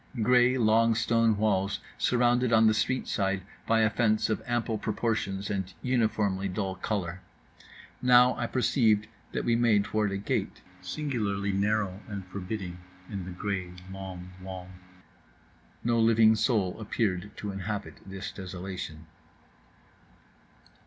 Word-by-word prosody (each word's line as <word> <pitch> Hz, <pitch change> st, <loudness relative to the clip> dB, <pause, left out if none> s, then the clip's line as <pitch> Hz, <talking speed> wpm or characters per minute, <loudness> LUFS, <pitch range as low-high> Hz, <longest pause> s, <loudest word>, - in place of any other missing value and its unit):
Grey 125 Hz, +2 st, +5 dB
long 115 Hz, 0 st, +4 dB
stone 115 Hz, -1 st, +2 dB
walls, 100 Hz, -2 st, +1 dB, 0.2 s
surrounded 125 Hz, 0 st, +2 dB
on 110 Hz, -1 st, +6 dB
the 110 Hz, -, +5 dB
street 130 Hz, +4 st, 0 dB
side 95 Hz, -1 st, 0 dB, 0.2 s
by 115 Hz, 0 st, +4 dB
a 110 Hz, -, +4 dB
fence 110 Hz, -1 st, +2 dB
of 110 Hz, -, -1 dB
ample 120 Hz, -2 st, -1 dB
proportions 105 Hz, -3 st, -1 dB
and 95 Hz, -2 st, -3 dB
uniformly 110 Hz, -6 st, +1 dB
dull 95 Hz, 0 st, -2 dB
colour. 95 Hz, -2 st, -3 dB, 0.8 s
Now 125 Hz, 0 st, +6 dB
I 120 Hz, -, -2 dB
perceived 115 Hz, -5 st, +2 dB, 0.3 s
that -, -, -2 dB
we 115 Hz, -, +3 dB
made 115 Hz, -4 st, +4 dB
toward 105 Hz, -1 st, 0 dB
a 100 Hz, -, -1 dB
gate, 100 Hz, -, -2 dB, 0.2 s
singularly 105 Hz, -9 st, -2 dB
narrow 100 Hz, -1 st, 0 dB
and 100 Hz, -3 st, -6 dB
forbidding, 90 Hz, -1 st, -5 dB, 0.3 s
in 100 Hz, -3 st, -4 dB
the 90 Hz, -, -6 dB
grey 95 Hz, -1 st, -3 dB, 0.2 s
long 95 Hz, -2 st, -7 dB
wall. 95 Hz, -1 st, -7 dB, 1.1 s
No 115 Hz, 0 st, +2 dB
living 115 Hz, -1 st, +5 dB
soul 105 Hz, -6 st, +1 dB
appeared 100 Hz, -3 st, -1 dB
to 105 Hz, -, -4 dB
inhabit 100 Hz, +2 st, -4 dB
this 95 Hz, 0 st, -6 dB
desolation. 90 Hz, -4 st, -7 dB
105 Hz, 130 wpm, -28 LUFS, 95-115 Hz, 1.1 s, on